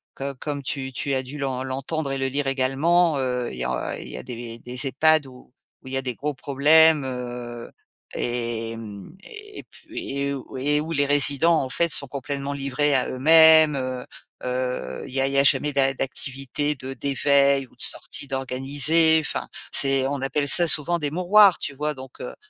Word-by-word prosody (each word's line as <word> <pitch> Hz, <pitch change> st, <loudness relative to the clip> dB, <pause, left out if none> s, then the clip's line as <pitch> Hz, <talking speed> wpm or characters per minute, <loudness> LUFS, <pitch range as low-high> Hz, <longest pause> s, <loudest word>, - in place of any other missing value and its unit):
co 140 Hz, 0 st, -5 dB
comme 145 Hz, -2 st, -4 dB
tu 135 Hz, 0 st, -5 dB
tu 140 Hz, +3 st, -3 dB
as 130 Hz, -, -1 dB
dû 145 Hz, +3 st, -9 dB
l'en 130 Hz, -2 st, -3 dB
l'entendre 135 Hz, +3 st, -4 dB
et 135 Hz, -, -2 dB
le 135 Hz, -, 0 dB
lire 140 Hz, +1 st, -2 dB
également, 145 Hz, +5 st, +2 dB
heu, 125 Hz, -2 st, -2 dB
il -, -, -9 dB
y 60 Hz, -, -4 dB
a 65 Hz, 0 st, -3 dB
il -, -, -9 dB
y 60 Hz, -, -8 dB
a -, -, -7 dB
des 115 Hz, -1 st, -7 dB
des 125 Hz, +2 st, -2 dB
EHPAD 155 Hz, +2 st, +3 dB
où 125 Hz, -1 st, -16 dB, 0.3 s
où -, -, -13 dB
il 130 Hz, -, -8 dB
y -, -, 0 dB
a -, -, -1 dB
des 125 Hz, -2 st, -3 dB
gros 150 Hz, +4 st, -3 dB
problèmes, 150 Hz, +3 st, +4 dB
heu, 120 Hz, -2 st, -7 dB, 0.4 s
et 115 Hz, -1 st, -3 dB
mmh, 105 Hz, -, -10 dB
et 420 Hz, -1 st, -11 dB
puis -, -, -9 dB
et 140 Hz, 0 st, -1 dB
où 135 Hz, -1 st, -9 dB
et 145 Hz, +3 st, 0 dB
où 160 Hz, -, -6 dB
les 145 Hz, -3 st, +1 dB
résidents 145 Hz, +3 st, +3 dB
en 130 Hz, -, -5 dB
fait 170 Hz, +5 st, 0 dB
sont -, -, +5 dB
complètement 140 Hz, +1 st, -5 dB
livrés 140 Hz, +1 st, 0 dB
à 130 Hz, -, +1 dB
eux-mêmes, 160 Hz, +2 st, +6 dB
heu 130 Hz, -1 st, -4 dB, 0.4 s
heu, 125 Hz, 0 st, -4 dB
il 130 Hz, -, -12 dB
y -, -, 0 dB
a -, -, +2 dB
il 135 Hz, -, -3 dB
y -, -, 0 dB
a -, -, +4 dB
jamais 145 Hz, +1 st, +3 dB
d'a 135 Hz, -1 st, +2 dB
d'activités 135 Hz, +2 st, -3 dB
de 130 Hz, 0 st, -8 dB
d'éveil 140 Hz, +1 st, +2 dB
ou -, -, -26 dB
de -, -, -12 dB
sorties 140 Hz, -, -1 dB
d'organisées. 140 Hz, +5 st, +2 dB
Enfin, 150 Hz, -, -4 dB, 0.2 s
c'est 135 Hz, -1 st, +2 dB
on 140 Hz, -1 st, -3 dB
appelle 145 Hz, +2 st, -1 dB
ça 175 Hz, +4 st, +6 dB
souvent 165 Hz, +3 st, +1 dB
des 150 Hz, -2 st, -2 dB
mouroirs, 185 Hz, +3 st, +5 dB
tu 145 Hz, -, -4 dB
vois? 150 Hz, +1 st, -3 dB
Donc 130 Hz, 0 st, -12 dB
heu -, -, -7 dB
135 Hz, 205 wpm, -23 LUFS, 130-150 Hz, 0.4 s, eux-mêmes